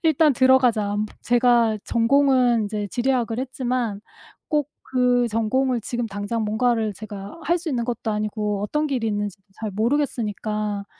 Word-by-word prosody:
'일단 315 -2 +4
들어가자.' 250 -5 +3
안부 210 +1 -2
제가 240 -2 +3
전공은 250 -1 +3
인제 210 0 -3
지리학을 240 -1 0
했지만 250 -4 -2 0.5
꼭 295 -3 0 0.3
그 250 -1 +3
전공을 235 +3 0
지금 240 +2 -3
당장 205 +2 -3
뭔가를 220 0 +1
제가 205 - -9
할 345 +4 +2
수 335 -2 -4
있는 245 -4 -1
것도 235 -2 -2
아니고 210 -1 -2
어떤 300 +9 0
길이 255 -6 -1
있는지도 205 -2 -3 0.2
잘 220 -1 -3
모르겠으니까 215 -3 -1
235 Hz, 330 characters per minute, -23 LUFS, 210-255 Hz, 0.5 s, 일단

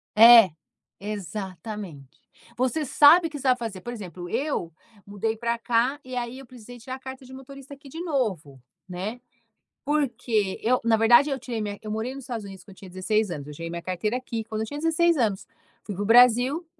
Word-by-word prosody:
É, 225 -2 +9 0.5
exatamente. 195 - -7 0.4
Você 260 +5 0
sabe 325 +5 +6
que 300 - -7
você 270 - -3
vai 255 - +5
fazer, 225 -6 -6
por 240 +3 -6
exemplo, 180 -5 -8
eu 270 - -2 0.3
mudei 210 +2 -3
pra 235 0 -1
cá, 240 +5 0
e 255 0 -8
aí 245 +1 -4
eu 270 - -12
precisei 245 0 -13
tirar 255 +3 -7
a 265 - -12
carta 265 0 -9
de 260 - -13
motorista 275 +1 -11
aqui 280 0 -14
de 320 +5 -8
novo, 200 - -3 0.3
né, 200 +7 -5 0.6
porque 240 -8 -1
eu 250 +3 +2
na 230 -1 +4
verdade, 240 +6 +5
eu 270 - -2
tirei 240 -3 -5
minha 205 -1 -4
eu 215 - -8
morei 225 +4 -3
nos 275 -2 -9
Estados 230 -4 -5
Unidos 195 -1 -11
quando - - -16
eu - - -17
tinha 190 - -12
16 205 +2 -1
anos, 145 -4 -6
eu 150 - -9
tirei 165 +2 -7
minha 170 0 -5
carteira 185 +6 -2
aqui, 235 -3 -5
quando 220 0 -4
eu - - -3
tinha 290 +5 -7
16 330 +2 +2
anos. 215 -7 -1 0.4
Fui 205 - -6
para 195 - -4
o 205 - -2
Brasil, 250 +7 +5
230 Hz, 205 wpm, -25 LUFS, 200-260 Hz, 0.6 s, É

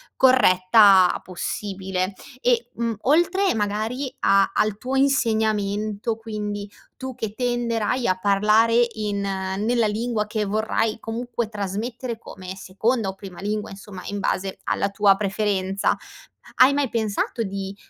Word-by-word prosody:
corretta 195 -6 +5
possibile 190 +1 -3 0.3
e, 240 -1 +1
mhmm, 230 -1 -2
oltre 345 +7 +3
magari 220 +5 -2
a 195 0 +4
al 215 -1 +1
tuo 255 +4 -3
insegnamento, 220 -5 +1
quindi 210 -2 -5 0.3
tu 260 0 -6
che 215 -3 -4
tenderai 240 0 -1
a 185 - +2
parlare 215 +4 +4
in 210 -2 -2
nella 200 +4 0
lingua 220 0 -1
che 215 0 -2
vorrai 220 +2 0
comunque 235 0 -4
trasmettere 225 +4 -4
come 185 -4 -9
seconda 200 +3 -1
o 190 - -6
prima 195 -2 -10
lingua, 210 +1 -2
insomma 195 -1 -10
in 205 0 -4
base 195 0 -2
alla 200 - 0
tua 200 -1 +4
preferenza, 195 -1 0 0.6
hai 260 +2 +6
mai 285 -2 0
pensato 220 +1 -1
di 195 -1 -5
215 Hz, 125 wpm, -23 LUFS, 195-235 Hz, 0.6 s, hai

